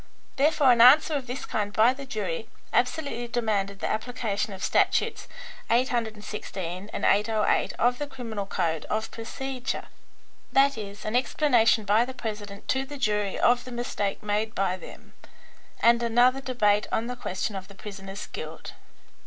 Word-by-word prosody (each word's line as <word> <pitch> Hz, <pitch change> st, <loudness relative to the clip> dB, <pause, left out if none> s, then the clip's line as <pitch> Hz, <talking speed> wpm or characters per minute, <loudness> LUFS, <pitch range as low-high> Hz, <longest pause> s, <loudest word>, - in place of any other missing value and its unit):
Therefore 290 Hz, -1 st, +4 dB
an 235 Hz, -1 st, +5 dB
answer 290 Hz, +6 st, +7 dB
of 275 Hz, -3 st, -2 dB
this 250 Hz, +2 st, -5 dB
kind 205 Hz, -2 st, -2 dB
by 225 Hz, +4 st, +4 dB
the 275 Hz, +1 st, -9 dB
jury 210 Hz, -2 st, -4 dB, 0.2 s
absolutely 250 Hz, -1 st, 0 dB
demanded 210 Hz, -5 st, -1 dB
the -, -, 0 dB
application 220 Hz, -2 st, -2 dB
of 190 Hz, 0 st, -8 dB
statutes -, -, +1 dB, 0.4 s
816 210 Hz, -6 st, -2 dB
and -, -, -2 dB
808 210 Hz, +1 st, +2 dB
of 245 Hz, +1 st, +1 dB
the 290 Hz, -, -3 dB
criminal 230 Hz, -7 st, -5 dB
code 165 Hz, -5 st, -1 dB
of 220 Hz, +1 st, -2 dB
procedure, 255 Hz, +3 st, -5 dB, 0.7 s
i.e., 225 Hz, -8 st, +2 dB
an 215 Hz, +2 st, -2 dB
explanation 245 Hz, -4 st, +3 dB
by 210 Hz, +3 st, +4 dB
the 260 Hz, +1 st, -7 dB
president 210 Hz, -4 st, -6 dB
to 265 Hz, +1 st, +1 dB
the 285 Hz, +2 st, -8 dB
jury 210 Hz, -5 st, 0 dB
of 245 Hz, 0 st, +3 dB
the 255 Hz, -, -9 dB
mistake 240 Hz, -5 st, -3 dB
made 210 Hz, +1 st, -1 dB
by 190 Hz, -1 st, +1 dB
them, 185 Hz, -, -13 dB, 0.7 s
and 235 Hz, 0 st, +5 dB
another 245 Hz, +3 st, +3 dB
debate 210 Hz, -6 st, +2 dB
on 225 Hz, -, 0 dB
the 250 Hz, +1 st, -4 dB
question 200 Hz, -3 st, -3 dB
of 190 Hz, 0 st, -6 dB
the 200 Hz, -, -14 dB
prisoner's 195 Hz, 0 st, -8 dB
guilt." -, -, -8 dB
225 Hz, 155 wpm, -26 LUFS, 205-250 Hz, 0.7 s, answer